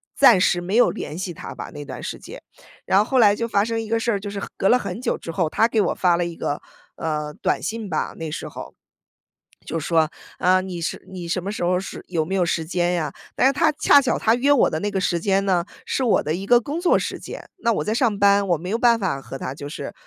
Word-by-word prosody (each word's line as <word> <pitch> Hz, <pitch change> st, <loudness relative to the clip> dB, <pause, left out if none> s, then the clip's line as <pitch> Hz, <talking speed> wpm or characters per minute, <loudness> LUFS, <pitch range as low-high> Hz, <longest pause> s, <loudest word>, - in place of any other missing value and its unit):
暂 245 Hz, -8 st, +7 dB
时 175 Hz, -1 st, +2 dB
没 185 Hz, +4 st, -3 dB
有 245 Hz, -, +5 dB
联 155 Hz, -, -6 dB
系 185 Hz, -1 st, -4 dB
他 -, -, -8 dB
吧， -, -, -7 dB
那 145 Hz, -, -7 dB
段 -, -, -8 dB
时 -, -, -5 dB
间。 -, -, -10 dB, 0.4 s
然 190 Hz, -, +3 dB
后 210 Hz, -, +3 dB
后 260 Hz, +2 st, +1 dB
来 205 Hz, -3 st, +6 dB
就 230 Hz, +2 st, -2 dB
发 205 Hz, -2 st, +2 dB
生 230 Hz, 0 st, -2 dB
一 220 Hz, -, -7 dB
个 230 Hz, 0 st, +1 dB
事 235 Hz, -, 0 dB
儿， 205 Hz, -, 0 dB
就 205 Hz, +1 st, -6 dB
是 200 Hz, 0 st, -5 dB, 0.2 s
隔 195 Hz, -, +2 dB
了 250 Hz, -, +5 dB
很 240 Hz, -, -5 dB
久 255 Hz, -, -1 dB
之 165 Hz, -, -7 dB
后， 165 Hz, -1 st, 0 dB
他 225 Hz, +7 st, +3 dB
给 225 Hz, -2 st, +1 dB
我 -, -, +1 dB
发 180 Hz, -2 st, +2 dB
了 175 Hz, 0 st, 0 dB
一 170 Hz, -1 st, -5 dB
个， 145 Hz, -, -3 dB, 0.3 s
呃， 150 Hz, -2 st, -3 dB
短 -, -, -1 dB
信 215 Hz, +1 st, -4 dB
吧， 155 Hz, -, -2 dB
那 160 Hz, -2 st, -5 dB
时 -, -, -5 dB
候。 -, -, -9 dB, 0.9 s
就 -, -, -3 dB
说： 160 Hz, 0 st, +1 dB, 0.3 s
“啊， 185 Hz, +1 st, +3 dB
你 185 Hz, -2 st, -6 dB
是 165 Hz, -, -4 dB
你 180 Hz, -2 st, -6 dB
什 175 Hz, +1 st, -2 dB
么 200 Hz, -, -3 dB
时 215 Hz, -, -6 dB
候 180 Hz, +1 st, +2 dB
是 190 Hz, -, -6 dB
有 170 Hz, -3 st, 0 dB
没 185 Hz, +5 st, -3 dB
有 185 Hz, -2 st, +2 dB
时 170 Hz, -1 st, -1 dB
间 175 Hz, +1 st, 0 dB
呀？” 165 Hz, -3 st, -1 dB, 0.2 s
但 -, -, +2 dB
是 265 Hz, -, +6 dB
他 295 Hz, +3 st, +2 dB
恰 285 Hz, -, +5 dB
巧 270 Hz, -3 st, 0 dB
他 225 Hz, -, +3 dB
约 255 Hz, +4 st, +1 dB
我 285 Hz, -, +5 dB
的 155 Hz, -, -2 dB
那 205 Hz, -, -1 dB
个 195 Hz, -2 st, -2 dB
时 175 Hz, -2 st, 0 dB
间 195 Hz, +2 st, +1 dB
呢， 180 Hz, -3 st, +1 dB, 0.2 s
是 260 Hz, -, -1 dB
我 230 Hz, -, +3 dB
的 155 Hz, -, -1 dB
一 190 Hz, +4 st, -4 dB
个 240 Hz, +3 st, +5 dB
工 290 Hz, +7 st, -4 dB
作 350 Hz, 0 st, +3 dB
时 -, -, -4 dB
间， -, -, -8 dB
那 230 Hz, 0 st, +1 dB
我 -, -, -1 dB
在 215 Hz, -, -1 dB
上 230 Hz, -3 st, +1 dB
班， 200 Hz, 0 st, +4 dB
我 175 Hz, -, +3 dB
没 180 Hz, +4 st, -7 dB
有 220 Hz, -, 0 dB
办 235 Hz, -1 st, +4 dB
法 190 Hz, -10 st, -2 dB
和 135 Hz, -, -8 dB
他 130 Hz, -, -5 dB
就 145 Hz, 0 st, -8 dB
是 145 Hz, -, -6 dB
190 Hz, 295 characters per minute, -22 LUFS, 170-225 Hz, 0.9 s, 暂